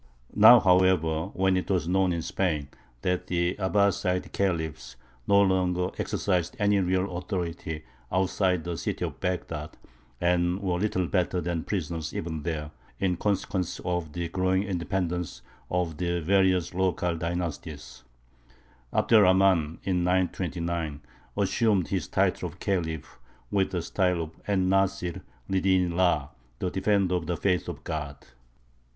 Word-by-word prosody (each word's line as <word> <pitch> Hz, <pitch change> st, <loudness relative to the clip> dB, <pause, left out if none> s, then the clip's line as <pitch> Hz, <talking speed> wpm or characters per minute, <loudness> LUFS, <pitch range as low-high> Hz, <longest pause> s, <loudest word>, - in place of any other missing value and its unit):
Now, 110 Hz, +3 st, +9 dB
however, 90 Hz, -4 st, +3 dB
when 95 Hz, 0 st, +2 dB
it 90 Hz, -, -2 dB
was 90 Hz, -4 st, +1 dB
known 95 Hz, 0 st, +2 dB
in 85 Hz, -1 st, -2 dB
Spain 75 Hz, -7 st, -1 dB, 0.3 s
that 90 Hz, 0 st, -1 dB
the 85 Hz, 0 st, +1 dB
Abbāside 95 Hz, -2 st, +1 dB
Khalifs 80 Hz, -9 st, -2 dB, 0.3 s
no 100 Hz, -, +5 dB
longer 90 Hz, -2 st, +1 dB
exercised 90 Hz, -4 st, -1 dB
any 105 Hz, -1 st, +3 dB
real 95 Hz, 0 st, 0 dB
authority 85 Hz, -4 st, -4 dB, 0.3 s
outside 95 Hz, -2 st, +1 dB
the 85 Hz, -1 st, -4 dB
city -, -, -2 dB
of -, -, -7 dB
Baghdad, 80 Hz, -4 st, -3 dB, 0.4 s
and 90 Hz, +1 st, +1 dB
were 90 Hz, -3 st, -1 dB
little 95 Hz, -2 st, 0 dB
better 90 Hz, 0 st, 0 dB
than 85 Hz, -2 st, -2 dB
prisoners 80 Hz, -5 st, -3 dB
even 80 Hz, -2 st, -3 dB
there, 75 Hz, -1 st, -4 dB, 0.3 s
in 95 Hz, -2 st, +1 dB
consequence 95 Hz, -2 st, -1 dB
of 90 Hz, -4 st, -2 dB
the 85 Hz, 0 st, -2 dB
growing 95 Hz, +2 st, +1 dB
independence 90 Hz, -2 st, -2 dB, 0.3 s
of 90 Hz, -3 st, -1 dB
the 85 Hz, +1 st, -1 dB
various 95 Hz, 0 st, +2 dB
local 90 Hz, -2 st, 0 dB
dynasties, 80 Hz, -5 st, -5 dB, 0.9 s
Abd -, -, +1 dB
er 110 Hz, -, +9 dB
Rahmān, 90 Hz, -4 st, +3 dB
in 90 Hz, -2 st, 0 dB
929, 85 Hz, -4 st, -1 dB, 0.4 s
assumed 105 Hz, -7 st, +2 dB
his -, -, -1 dB
title -, -, 0 dB
of -, -, -16 dB
Khalif 80 Hz, -9 st, -3 dB, 0.3 s
with 100 Hz, -2 st, +2 dB
the 90 Hz, -3 st, -2 dB
style 90 Hz, -1 st, +1 dB
of 80 Hz, -, -8 dB, 0.2 s
En 95 Hz, -2 st, +2 dB
Nāsir 95 Hz, -2 st, +1 dB, 0.3 s
li 95 Hz, -1 st, +1 dB
dīni 95 Hz, -2 st, +3 dB
llāh, 85 Hz, -5 st, +1 dB, 0.3 s
"The 90 Hz, -, -2 dB
Defender 95 Hz, -1 st, +1 dB
of 90 Hz, -2 st, -1 dB
the 85 Hz, -1 st, -1 dB
Faith 90 Hz, -3 st, 0 dB
of -, -, -7 dB
God." 75 Hz, -2 st, -4 dB
90 Hz, 140 wpm, -27 LUFS, 85-95 Hz, 0.9 s, Now